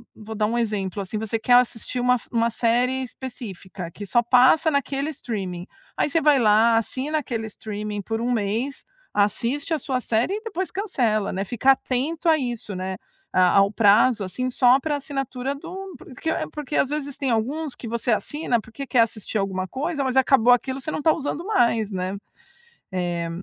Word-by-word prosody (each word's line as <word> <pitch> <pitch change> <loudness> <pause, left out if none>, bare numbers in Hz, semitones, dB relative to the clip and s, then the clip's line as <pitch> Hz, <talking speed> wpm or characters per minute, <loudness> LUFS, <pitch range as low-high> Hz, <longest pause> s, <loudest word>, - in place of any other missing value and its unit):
vou 220 +1 -8
dar 210 -1 +1
um 235 - -1
exemplo, 210 -4 -2
assim, 195 +2 -4
você 220 +1 -2
quer 245 +3 +2
assistir 245 0 +2
uma 250 0 +3
f - - -14
uma 230 0 +2
série 245 +3 +1
específica 200 -8 -8
que 205 +3 -8
só 240 +4 +3
passa 255 +7 +5
naquele 280 +1 -1
streaming, 190 - -5 0.3
aí - - +1
você 330 - +2
vai 295 -3 +4
lá, 225 0 +5
assina 270 +7 -1
aquele 235 -5 -4
streaming 210 -1 -5
por 225 +3 -3
1 245 +1 0
mês, 230 +5 -2 0.3
assiste 235 - 0
a - - +2
sua 260 -3 -2
série 230 - 0
e 425 - -3
depois 380 -4 -3
cancela, 240 - 0
né, 195 +2 -2
fica 245 +6 +3
atento 285 +7 -2
a 320 - +6
isso, 240 -6 -4
né, 185 +1 -4 0.3
a 180 -1 +4
ao 195 0 +5
prazo, 215 +1 +4
assim, 255 +7 -3
só 250 +1 +4
pra 295 +1 -1
assinatura 270 -2 -3
do 330 +5 -9
hum, 385 0 -7
pro 370 -7 -13
que 320 +4 -2 0.2
porque 300 -1 -5
às 265 - +2
vezes 285 -2 -3
tem 270 -2 -1
alguns 270 +6 -1
que 235 - -8
você 235 +1 -2
assina, 250 +2 0
porque 225 +5 -8
quer 245 0 +4
assistir 220 -1 -1
alguma 190 -1 -2
coisa, 285 - -2
mas 260 -1 -1
acabou 260 -2 +5
aquilo, 260 +2 -1
você - - -4
não 305 - -3
tá 315 - +5
usando 310 +3 -4
mais, 235 - +2
né? 185 +1 -3 0.8
Eh, 175 -2 -2
245 Hz, 190 wpm, -23 LUFS, 215-275 Hz, 0.8 s, a